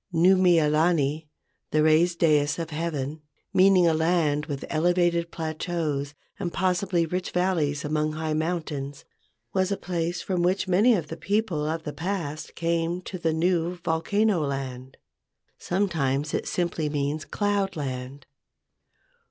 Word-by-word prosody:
Nuu 180 +3 +5
mea 175 -4 +4
lani 155 -1 +1 0.4
(the 155 0 +2
raised 165 +3 +4
dais 150 -3 +3
of 165 -1 -4
heaven), 150 -2 -3 0.3
meaning 185 -2 +5
a 165 - +4
land 160 -2 +1
with 140 -3 -4
elevated 170 +1 +1
plateaus 155 -3 -3 0.2
and 180 -4 -2
possibly 180 -1 +1
rich 180 +3 -3
valleys 165 -6 0
among 155 0 0
high 155 0 -2
mountains, 155 -4 -3 0.5
was 190 0 +1
a 200 - 0
place 175 -1 -2
from 185 -2 -1
which 185 +2 +1
many 210 +7 +4
of 160 -6 -3
the 165 - -6
people 185 -4 -1
of 160 +1 -2
the 150 - -5
past 165 -4 -4
came 170 +1 0
to 185 - -6
the 165 -1 +1
new 170 +1 +1
volcano 175 +4 +1
land. 130 -2 -5 0.6
Sometimes 155 -7 0
it - - -1
simply 170 -3 -1
means 145 +1 -2
"cloud 205 -2 -1
land." 135 -1 -5
165 Hz, 140 wpm, -26 LUFS, 150-180 Hz, 0.6 s, Nuu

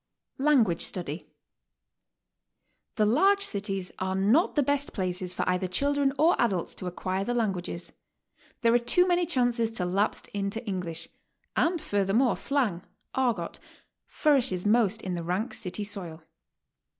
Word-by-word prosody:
L.\NGUAGE 255 - +3
STUDY. 170 -3 -4 1.7
The 215 - +3
large 385 - +4
cities 195 - -2
are 190 0 -1
not 215 - +3
the 295 - +3
best 285 +1 -1
places 185 -2 -2
for 180 - -3
either 180 +1 +1
children 280 +8 +1
or 325 +3 +4
adults 195 -8 0
to 185 - -7
acquire 185 +2 -2
the 245 +4 -2
languages. 185 -6 -3 0.7
There 230 -1 +4
are 240 - +5
too 245 +10 +3
many 350 -1 +2
chances 245 -6 +2
to 185 -5 -1
lapse 195 +4 0
into 205 +3 -3
English, 175 -5 -4 0.5
and 340 +1 +2
furthermore 205 +3 +1
slang, 245 -11 0 0.3
"argot," 235 -10 -1 0.5
flourishes 250 - +1
most 220 0 +2
in 185 - -3
the 175 - -3
rank 185 +8 -2
city 210 -1 -4
soil. 175 -6 -7
210 Hz, 140 wpm, -27 LUFS, 185-255 Hz, 1.7 s, are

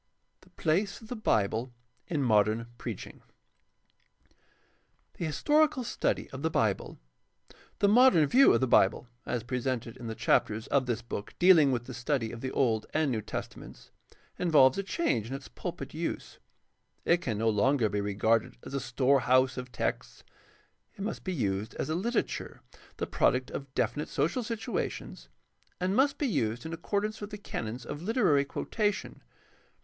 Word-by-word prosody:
THE - - -22
PLACE 190 +6 0
OF 220 - -14
THE 250 - -3
BIBLE 115 - 0 0.4
IN 150 -5 -1
MODERN 110 -1 +3
PREACHING - - -7 2.0
The 170 - -1
historical 295 - +2
study 235 - -1
of 130 - -7
the 160 - +1
Bible. 110 -10 0 0.4
— - - -26
The 200 - +5
modern 225 - +6
view 260 - +6
of - - +3
the 130 - +2
Bible 115 +1 +3 0.2
as 120 -2 -2
presented 125 -1 -3
in 120 - -8
the 110 - -4
chapters 110 0 +1
of 135 -2 +1
this 120 -1 -2
book 110 -3 -6
dealing 170 -6 +6
with 120 -2 -1
the 130 - -8
study 120 -1 -1
of 115 - -8
the 130 - -2
Old 115 -5 +1
and 155 -3 +2
New 110 -3 -1
Testaments - - -8 0.5
involves 150 -7 +5
a - - +2
change 190 - -1
in 135 - -4
its 135 - -8
pulpit - - -6
use. - - -4 0.7
It 170 - +4
can 110 -9 -2
no 115 +1 +2
longer 115 +3 +2
be 105 0 -1
regarded 105 - +1
as - - -9
a 140 - 0
storehouse 130 0 +2
of 125 -1 -6
texts. - - -3 0.7
It - - -10
must 210 +3 -4
be 190 - -3
used 105 - -2
as - - -3
a - - 0
literature, 230 +8 -2 0.4
the - - -2
product 130 -1 +1
of 140 -1 -6
definite 120 +7 -1
social 175 +11 0
situations, 230 -1 -4 0.5
and 185 +2 0
must 275 +3 +3
be 295 - -1
used 120 - -1
in 160 - -5
accordance 210 +5 -2
with 205 - -5
the 210 - -7
canons 120 - -5
of 145 - -6
literary 185 - +2
quotation. 210 +7 -2
135 Hz, 165 wpm, -29 LUFS, 115-185 Hz, 2.0 s, modern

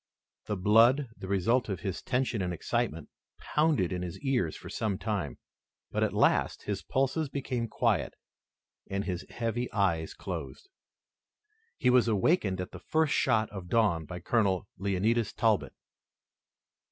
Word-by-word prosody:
The 105 - -1
blood, 115 +8 +5
the 95 - -8
result 110 +6 +1
of 95 -4 -3
his 95 -4 -3
tension 125 -4 0
and 90 -1 -1
excitement, 85 - -2 0.3
pounded 150 - +1
in 90 - -3
his 90 -2 -5
ears 125 - 0
for - - -10
some 105 -4 -2
time, 100 -10 -3 0.5
but, - - 0
at - - +1
last, - - +2
his 100 -1 -3
pulses 135 +3 0
became 130 -4 -2
quiet, 110 - 0 0.7
and 100 +1 -1
his 90 -2 -3
heavy 120 +1 -2
eyes 85 -6 0
closed. 385 - -6 1.1
He 125 - +3
was 125 -2 +5
awakened 105 - +2
at 90 - -4
the - - -9
first 160 -2 +1
shoot 110 -4 +2
of 95 -3 -7
dawn 100 -8 +2
by 90 +3 -7
Colonel 100 -2 +1
Leonidas 100 +4 +1
Talbot. 110 -3 +1
105 Hz, 145 wpm, -30 LUFS, 95-125 Hz, 1.1 s, blood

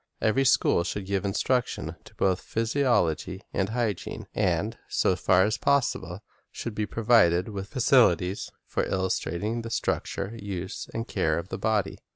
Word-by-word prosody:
Every 135 +5 +2
school 125 -8 +4
should 95 +2 -4
give 95 -1 -1
instruction 125 +5 0
in - - -7 0.2
both 95 -1 +1
physi 115 +5 -1
ology 95 - +1
and 100 0 0
hygiene, 110 -5 -2
and, - - 0
so 95 - +2
far 95 0 +4
as 105 +4 0
possible, 140 -2 0 0.3
should 115 - -5
be 105 0 -2
provided 105 -6 +3
with 100 -2 -5
facilities 110 - +3 0.2
for - - -1
illustrating 95 +4 -1
the 115 - -6
structure, 110 -1 -2
use, 95 -1 -5
and 115 0 -4
care 80 -1 0
of 85 +3 -5
the - - -5
body. 110 -3 0
100 Hz, 155 wpm, -27 LUFS, 95-115 Hz, 0.3 s, school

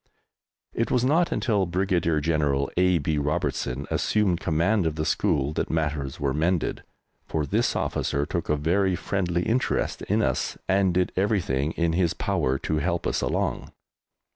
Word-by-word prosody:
It 115 - -1
was 125 -1 +2
not 165 +6 +2
until 105 -7 +1
Brigadier 85 -3 +1
General 70 -3 0
A. 90 0 +3
B. 75 0 -1
Robertson 75 -4 -2
assumed 100 -5 +1
command 85 +4 +1
of 80 - -2
the 80 0 -2
school 70 -1 +1
that - - -2
matters 75 -4 -2
were 70 -2 0
mended, 80 +3 0 0.5
for 75 -2 -1
this 70 - 0
officer 70 +1 -1
took 85 +2 -3
a 75 - +3
very 90 +5 +1
friendly 90 -1 -1
interest 125 +5 0
in - - +1
us - - -1
and 95 -1 +3
did 90 0 +1
everything 90 -8 0
in 85 -1 0
his 85 -1 +1
power 65 +1 0
to 80 - -2
help 85 +2 -1
us - - 0
along. - - -2
85 Hz, 160 wpm, -25 LUFS, 75-95 Hz, 0.5 s, A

